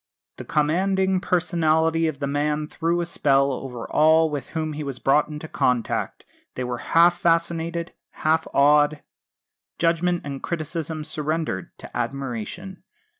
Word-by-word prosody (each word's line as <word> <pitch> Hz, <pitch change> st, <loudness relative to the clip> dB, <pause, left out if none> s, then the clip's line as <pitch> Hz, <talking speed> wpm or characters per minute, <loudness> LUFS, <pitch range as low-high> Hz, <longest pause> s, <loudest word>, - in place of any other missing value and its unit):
The -, -, -8 dB
commanding 190 Hz, +5 st, +1 dB
personality 165 Hz, -2 st, +1 dB
of 155 Hz, -3 st, -3 dB
the 140 Hz, -, -3 dB
man 150 Hz, +2 st, 0 dB
threw 170 Hz, +3 st, -1 dB
a -, -, -1 dB
spell 140 Hz, -4 st, +2 dB
over 125 Hz, -2 st, -6 dB
all 160 Hz, +1 st, +4 dB
with 145 Hz, -3 st, -4 dB
whom 155 Hz, -1 st, -2 dB
he 150 Hz, +1 st, -5 dB
was 140 Hz, -3 st, -5 dB
brought 145 Hz, +4 st, +3 dB
into 150 Hz, +1 st, -7 dB
contact; 125 Hz, -5 st, -1 dB, 0.3 s
they 130 Hz, -, -3 dB
were 125 Hz, -1 st, -3 dB
half 170 Hz, +1 st, +4 dB
fascinated, 170 Hz, 0 st, 0 dB, 0.3 s
half 160 Hz, +1 st, +2 dB
awed 145 Hz, +1 st, +4 dB, 0.7 s
judgment 170 Hz, +1 st, +1 dB
and 140 Hz, -1 st, -5 dB
criticism 160 Hz, -1 st, -4 dB
surrendered 155 Hz, -, -3 dB
to -, -, -12 dB
admiration. 135 Hz, -, -4 dB
155 Hz, 135 wpm, -24 LUFS, 140-170 Hz, 0.7 s, all